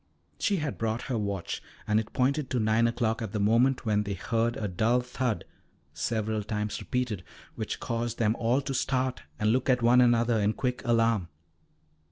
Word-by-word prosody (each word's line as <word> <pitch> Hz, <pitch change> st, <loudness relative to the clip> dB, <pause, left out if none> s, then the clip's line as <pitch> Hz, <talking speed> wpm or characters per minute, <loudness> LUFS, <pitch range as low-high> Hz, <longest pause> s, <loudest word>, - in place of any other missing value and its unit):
She 205 Hz, -, +2 dB
had 150 Hz, -4 st, -3 dB
brought 115 Hz, +1 st, -1 dB
her 125 Hz, -, -2 dB
watch, 100 Hz, -3 st, -3 dB, 0.3 s
and 105 Hz, 0 st, +3 dB
it 110 Hz, 0 st, -5 dB
pointed 140 Hz, +2 st, +1 dB
to 125 Hz, -, 0 dB
nine 110 Hz, +1 st, +3 dB
o'clock 115 Hz, -1 st, 0 dB
at 110 Hz, -3 st, -4 dB
the 105 Hz, -, -1 dB
moment 115 Hz, +6 st, +3 dB
when 105 Hz, -2 st, +2 dB
they 100 Hz, -1 st, -3 dB
heard 115 Hz, +5 st, 0 dB
a 105 Hz, -, -2 dB
dull 110 Hz, +7 st, +2 dB
thud 125 Hz, -2 st, -2 dB, 0.5 s
several 110 Hz, +6 st, -1 dB
times 105 Hz, 0 st, -3 dB
repeated, 120 Hz, -7 st, -2 dB, 0.3 s
which -, -, -4 dB
caused 115 Hz, -1 st, -2 dB
them 110 Hz, -1 st, +2 dB
all 120 Hz, +4 st, +2 dB
to 135 Hz, 0 st, -4 dB
start 130 Hz, -1 st, 0 dB, 0.2 s
and 105 Hz, +1 st, +2 dB
look 130 Hz, +3 st, +1 dB
at 125 Hz, -2 st, +3 dB
one 125 Hz, +2 st, +6 dB
another 120 Hz, -1 st, +3 dB
in 105 Hz, +1 st, +2 dB
quick 125 Hz, +1 st, -2 dB
alarm. 115 Hz, -5 st, +2 dB
115 Hz, 185 wpm, -28 LUFS, 110-125 Hz, 0.5 s, one